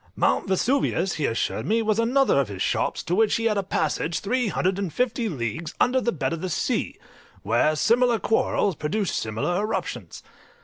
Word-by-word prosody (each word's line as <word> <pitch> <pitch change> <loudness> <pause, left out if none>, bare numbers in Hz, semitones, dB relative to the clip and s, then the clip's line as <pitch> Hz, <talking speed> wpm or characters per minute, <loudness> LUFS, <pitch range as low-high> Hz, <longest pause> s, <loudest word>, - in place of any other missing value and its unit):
Mount - - +1
Vesuvius, 190 -2 +1
he 150 - 0
assured 115 - -2
me, 225 +2 +2
was 215 0 +1
another 250 - +3
of 140 - +1
his 100 -2 -4
shops, - - -1
to 175 - -2
which 215 +2 +3
he 230 - -1
had 220 -2 +2
a 200 - +1
passage 165 -2 -1
three 245 +4 0
hundred 190 0 0
and 195 -5 -2
fifty 245 - -1
leagues 155 - -4
under 255 +1 +3
the 235 - 0
bed 170 - -2
of 165 - -5
the 185 - -3
sea, 160 - -1 0.5
where 115 +9 +2
similar 235 +7 +3
quarrels 205 -4 +1
produced 190 +7 -2
similar 110 +11 -1
eruptions. 215 +1 -4
195 Hz, 185 wpm, -24 LUFS, 160-230 Hz, 0.5 s, another